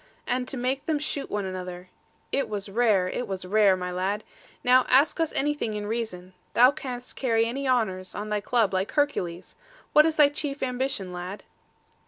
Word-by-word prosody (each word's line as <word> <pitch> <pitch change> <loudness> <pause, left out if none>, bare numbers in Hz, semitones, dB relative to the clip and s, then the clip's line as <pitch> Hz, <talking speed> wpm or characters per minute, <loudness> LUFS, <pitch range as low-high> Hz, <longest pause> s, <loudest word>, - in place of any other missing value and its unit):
And 250 0 -1
to 265 - -4
make 260 +3 -1
them 315 -2 +2
shoot 290 -1 -3
one 205 -1 -2
another: 180 -1 -6 0.4
it 275 - 0
was 205 -1 -4
rare; 205 -4 +3
it 245 +6 -3
was 190 -2 -5
rare, 200 0 +4
my 180 0 -4
lad. 195 +4 -1 0.4
Now 255 +1 +6
ask 275 +6 +4
us 325 -1 +1
anything 290 -6 0
in 210 0 -3
reason; 205 -5 -4 0.2
thou 250 +3 +7
canst 255 -4 -7
carry 230 -3 +2
any 270 +4 -3
honours, 190 -7 0
on 210 +1 -4
thy 210 -1 0
club, 220 -3 +1
like 190 +2 -1
Hercules. 185 - -1 0.4
What 305 +1 +7
is 320 - 0
thy 295 -2 +6
chief 285 -1 -3
ambition, 250 -7 -2
lad?' 180 +3 -6
225 Hz, 185 wpm, -26 LUFS, 190-265 Hz, 0.4 s, thou